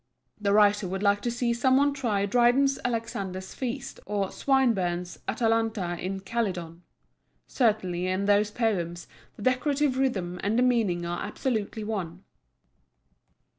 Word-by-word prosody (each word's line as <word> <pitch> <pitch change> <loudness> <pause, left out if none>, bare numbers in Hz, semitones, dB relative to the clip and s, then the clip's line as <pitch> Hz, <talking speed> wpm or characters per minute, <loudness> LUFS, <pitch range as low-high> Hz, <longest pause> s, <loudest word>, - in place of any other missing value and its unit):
The 200 -1 0
writer 205 -1 +4
would 190 +2 -3
like 205 0 +3
to 240 - -1
see 240 0 0
some 260 +2 +3
one 285 +1 +3
try 220 -8 0
Dryden's 245 +5 +3
Alexander's 200 -6 -3
Feast, 245 -3 -5
or 200 -2 -1
Swinburne's 190 -10 0
Atalanta 225 -4 0
in 190 +2 -4
Calydon. 185 -6 -3 0.6
Certainly 190 -7 0
in 185 +2 0
those 205 +1 +3
poems 180 -7 -2 0.3
the 205 - -9
decorative 270 +2 +1
rhythm 190 -10 -1
and 210 +3 0
the 250 - +4
meaning 215 -9 +1
are 175 0 -3
absolutely 215 0 -2
one. 190 -4 -4
210 Hz, 135 wpm, -27 LUFS, 185-240 Hz, 0.6 s, writer